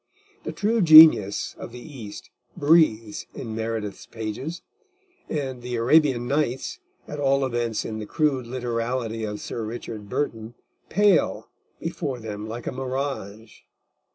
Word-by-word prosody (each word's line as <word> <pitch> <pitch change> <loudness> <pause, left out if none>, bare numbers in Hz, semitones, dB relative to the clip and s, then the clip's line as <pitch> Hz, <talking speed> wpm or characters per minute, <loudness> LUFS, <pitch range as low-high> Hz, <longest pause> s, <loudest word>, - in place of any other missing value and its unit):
The - - -3
true 220 +2 +1
genius 155 - +8
of - - -8
the 125 - -9 0.2
East 105 -2 -9 0.3
breathes 145 -9 +3
in 115 -3 -6
Meredith's 110 -2 -4
pages, 115 +10 -5 0.7
and 135 -5 -3
the 125 0 -4
Arabian 125 0 +3
Nights, 140 - -1 0.3
at 150 - -6
all 135 -1 +2
events 120 -3 -2
in 110 -1 -4
the 105 - -6
crude 140 -5 0
literality 115 -2 -2
of 105 -1 -5
Sir 115 - -5
Richard 110 -2 -7
Burton, 115 -4 -3 0.3
pale 200 -1 +2 0.3
before 130 -2 -3
them 105 -1 -6
like 115 +2 -6
a - - -2
mirage. 130 -5 -5
120 Hz, 130 wpm, -24 LUFS, 110-140 Hz, 0.7 s, genius